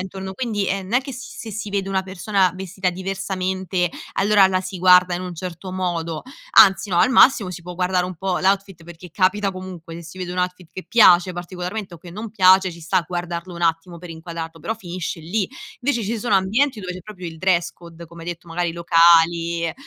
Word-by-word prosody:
intorno, 190 0 -6
quindi 215 -4 -2
è 195 +1 -1
non 190 +3 -10
è 250 - +4
che 270 0 -8
si 255 - -9
se 225 - -7
si 210 0 -5
vede 195 -1 -2
una 190 -1 0
persona 190 0 0
vestita 190 0 -3
diversamente, 190 -1 -2 0.3
allora 200 0 +5
la 185 -1 0
si 185 +1 -6
guarda 180 0 +6
in 175 - -4
un 180 -1 -6
certo 180 +2 -7
modo, 170 -3 -3 0.4
anzi 195 +1 +6
no, 175 - +2
al - - +5
massimo 255 -6 +5
si 175 -1 -8
può 180 +1 -8
guardare 180 0 0
un 180 -1 -6
po' 185 +1 -1
l'outfit, 195 -3 0
perché 175 +1 -12
capita 195 +3 +1
comunque 185 -3 -9
se 170 - -8
si 170 +3 -11
vede 180 -1 -5
un 180 - -5
outfit 180 -1 -3
che 185 - -8
piace 185 -5 +5
particolarmente 180 +2 -6
o 170 - -12
che 175 +1 -12
non 215 +5 -6
piace, 190 -2 +5
ci 170 0 -12
sta 170 +2 +1
guardarlo 175 0 -4
un 170 - -7
attimo 165 +1 0
per 170 0 -10
inquadrarlo, 165 0 -7
però 225 - -3
finisce 180 -4 -6
lì. 185 +5 -2 0.3
Invece 245 -2 0
ci 225 +3 -2
sono 215 -1 0
ambienti 220 +6 +1
dove 180 -2 -5
c'è 180 - -8
proprio 185 -2 -8
il 165 -1 -11
dress 175 -1 +1
code, 170 -1 -13
come 165 0 -12
hai - - -6
detto, 175 0 -7
magari 170 0 -2
locali, 170 0 +3
185 Hz, 220 wpm, -21 LUFS, 170-195 Hz, 0.4 s, guarda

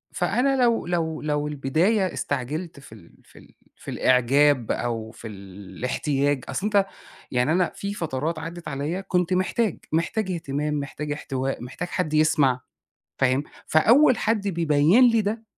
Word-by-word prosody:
فأنا 270 +2 +1
لو 235 -1 +2
لو 165 -3 -1
لو 150 -1 -1
البداية 165 +8 +1
استعجلت 145 +4 -4
في 135 -5 -13
ال 85 -6 -17
في - - -18
ال - - -19 0.2
في - - -9
الإعجاب 130 0 +3
أو 115 -2 -3
في 115 0 -10
الاحتياج 110 - -3
أصلًا 195 - -3
أنت 205 -2 +3 0.5
يعني 125 +4 +1
أنا 175 +1 +2
في 200 0 -4
فترات 160 -2 -3
عدِّت 170 +2 -7
عليّا 150 +7 -3
كنت 180 -1 0
محتاج، 185 +2 0
محتاج 185 +5 0
اهتمام، 150 -3 -2
محتاج 145 +1 -5
احتواء، 135 -3 -3
محتاج 135 +8 -6
حد 175 -4 -2
يسمع، 145 -5 +3 0.6
فاهم؟ 130 +2 +2 0.2
فأول 240 - +5
حد 215 -2 0
بيبيّن 165 - +4
لي 230 -1 +3
ده، 220 +2 -3
155 Hz, 145 wpm, -24 LUFS, 135-185 Hz, 0.6 s, فأول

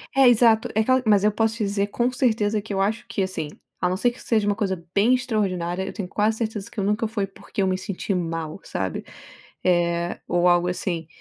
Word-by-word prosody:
É, 270 -1 +7
exato. 230 -2 +5
É - - +3
aquela 255 +3 +3
mas 205 -2 +4
eu 210 - +4
posso 225 +1 +1
te 225 - -1
dizer 200 0 0
com 240 +4 0
certeza 220 -4 +1
que 205 0 -6
eu 195 - 0
acho 210 +3 0
que, - - -2
assim 185 -5 -3 0.3
a 180 - +3
não 180 - 0
ser 240 +6 +2
que 240 - -14
seja 220 -3 +1
uma 205 0 +1
coisa 190 -5 -2
bem 210 +6 +4
extraordinária, 190 -8 -1
eu 195 - -6
tenho 200 - -4
quase 215 +2 +1
certeza 215 -3 -3
que - - -19
eu - - -1
nunca 210 +3 +1
foi 215 -2 -2
porque 195 +1 -6
eu 190 - +2
me 185 0 +1
senti 195 +1 -3
mal, 165 -2 -3
sabe 95 -3 -4 0.6
eh, 175 -1 +1
ou 175 0 +2
algo 175 0 +4
assim. 175 -3 -2
205 Hz, 230 wpm, -24 LUFS, 180-220 Hz, 0.6 s, É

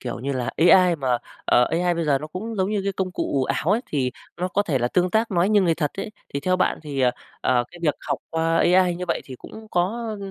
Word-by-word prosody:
kiểu 120 - -5
như 140 +2 -2
là, 125 -3 -2 0.2
AI 180 -2 +6
mà, 130 -4 0 0.3
ờ, 125 - +4
AI 175 +1 +1
bây 165 -1 -1
giờ 145 -3 +2
nó 150 - -6
cũng 200 +9 -6
giống 190 +2 0
như 210 - 0
cái 200 - 0
công 185 -1 -2
cụ 135 -6 -1
ảo 160 +7 -1
ấy, 220 - +3
thì 130 -4 -1 0.3
nó 180 +1 -2
có 200 +2 +1
thể 150 -10 0
là 120 0 0
tương 180 +3 +1
tác, 220 +3 +1
nói 180 0 +2
như 210 -1 +4
người 170 -3 +2
thật 150 -3 -1
ấy, 210 - -4 0.2
thì 140 - -1
theo 185 +5 +1
bạn - - +1
thì, 145 -3 -4
ờ, 125 -1 +4 0.3
ờ, 125 -1 +2
cái 175 - -13
việc 150 -3 +2
học 140 -3 0
qua 165 0 +1
AI 180 0 +4
như 180 +1 -4
vậy - - 0
thì 130 - -9
cũng 220 0 -11
có, 175 - +2 0.3
ơm, 200 -3 -6
170 Hz, 275 wpm, -23 LUFS, 140-190 Hz, 0.3 s, AI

